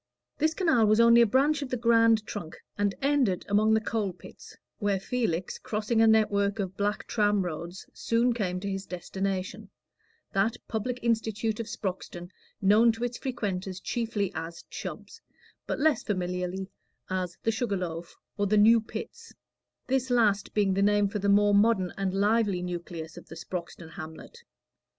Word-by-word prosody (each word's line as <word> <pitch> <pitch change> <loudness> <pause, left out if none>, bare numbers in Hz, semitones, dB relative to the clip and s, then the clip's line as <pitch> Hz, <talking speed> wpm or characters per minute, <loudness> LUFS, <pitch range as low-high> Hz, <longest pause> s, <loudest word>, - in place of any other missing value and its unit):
This 315 +1 +2
canal 320 - +3
was 215 +1 +4
only 235 0 +7
a 235 - +5
branch 285 +6 +2
of 280 - -4
the 250 - -1
grand 230 -2 +4
trunk, 175 -7 -7 0.2
and 205 -1 0
ended 270 -10 +2
among 215 +2 +3
the - - +3
coal 215 -3 -2
pits, 180 - -14 0.2
where 205 -2 +1
Felix, 190 -5 -2
crossing 220 +1 0
a 225 - +6
network 205 -2 +3
of 190 -2 -3
black 205 +1 -1
tram 205 -3 +1
roads, 175 +2 -6
soon 235 +1 +1
came 185 -6 -2
to 200 - -4
his 195 0 -4
destination 190 +2 -4 0.6
that 205 +4 +1
public 235 +3 -2
institute 225 -1 0
of 230 - -4
Sproxton, 180 -3 -5 0.3
known 215 +4 +6
to 225 +2 -6
its 245 0 -3
frequenters 195 -8 -3
chiefly 210 -2 -2
as 165 +1 -6
Chubb's, 455 - -7 0.5
but - - -2
less 305 -6 +3
familiarly 180 0 -3 0.4
as 185 -2 -2
the 225 - +2
Sugar 220 -3 -1
Loaf, 170 -2 -6 0.2
or 205 - +2
the 215 +2 +2
New 225 +2 +6
Pits; 460 - -8 0.5
this 260 0 0
last 215 -5 +2
being 200 -2 +3
the 195 - +1
name 205 0 +3
for 210 - -3
the 200 +1 0
more 205 0 +5
modern 200 -3 +3
and 195 -1 -1
lively 205 -2 +2
nucleus 170 -2 -6
of - - -11
the - - -10
Sproxton 170 -1 -7
hamlet. 160 - -10
205 Hz, 165 wpm, -28 LUFS, 185-230 Hz, 0.6 s, only